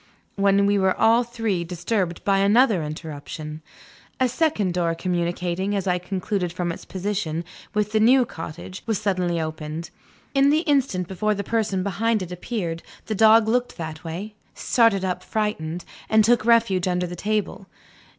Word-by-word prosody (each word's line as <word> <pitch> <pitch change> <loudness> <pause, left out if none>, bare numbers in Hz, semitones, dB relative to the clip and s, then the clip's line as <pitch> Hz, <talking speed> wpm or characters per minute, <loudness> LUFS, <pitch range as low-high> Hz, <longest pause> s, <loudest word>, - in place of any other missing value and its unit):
when 200 0 +3
we 200 0 +3
were 190 -1 +1
all 230 +2 +5
three 225 -7 -2
disturbed 175 +1 -2
by 195 -1 +2
another 210 0 +4
interruption. 155 0 -7 0.6
A 260 - +4
second 240 - 0
door 170 -2 0
communicating, 175 +2 -1
as 195 -1 -1
I 180 -1 +1
concluded 185 0 -2
from 175 -1 -2
its - - -8
position, 185 -4 -3 0.3
with 210 0 0
the 215 - +2
new 250 +3 +5
cottage, 165 0 -8
was 220 -3 +1
suddenly 185 -5 0
opened. 155 +1 -5 0.4
In 275 0 +4
the 305 +2 +3
instant 270 - +1
before 210 +3 0
the 200 - -3
person 210 -4 0
behind 210 +2 0
it 180 - -8
appeared, 180 -3 -4 0.2
the 220 - -2
dog 220 +1 +6
looked 245 +2 0
that 160 -1 -6
way 180 +6 -6 0.2
started 225 -6 +2
up, 180 -1 -2
frightened 180 -6 -3 0.2
and 220 0 +5
took 230 -1 +3
refuge 225 -6 +3
under 180 0 0
the 175 0 -6
table. 205 0 -2
195 Hz, 160 wpm, -23 LUFS, 175-220 Hz, 0.6 s, dog